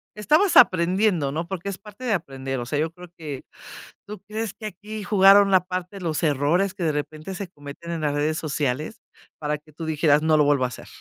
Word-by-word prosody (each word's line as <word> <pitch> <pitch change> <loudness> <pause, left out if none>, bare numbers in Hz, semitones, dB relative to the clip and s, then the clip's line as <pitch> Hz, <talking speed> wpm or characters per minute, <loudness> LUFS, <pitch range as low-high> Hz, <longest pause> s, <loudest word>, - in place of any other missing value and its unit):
estabas 310 - +2
aprendiendo, 180 - +4
¿no?, 165 +3 -3
porque 190 0 -5
es 195 -1 -3
parte 210 +5 -11
de 225 - +1
aprender. 135 -6 -3
O 120 - -4
sea, 145 +3 -2
yo 160 +1 0
creo 180 0 -13
que 145 -5 -7 0.6
¿Tú 210 0 -8
crees 215 -1 -4
que 215 - -7
aquí 215 +1 -8
jugaron 195 0 +6
la 185 -1 +4
parte 185 +2 -5
los 165 -2 -2
errores 160 +7 +2
que 185 -3 -5
de 160 - +2
repente 155 +5 -5
se 200 -1 -5
cometen 145 +2 -10
en 165 -2 -3
las 145 -1 0
redes 155 +2 0
sociales 155 - -2 0.4
para 150 0 -2
que 150 0 -22
tú 160 +1 -7
dijeras: 150 -1 +3
"No 155 -1 +3
lo 150 - +4
vuelvo 145 -3 +3
a - - +2
hacer"? 120 - -10
170 Hz, 220 wpm, -24 LUFS, 150-195 Hz, 0.6 s, jugaron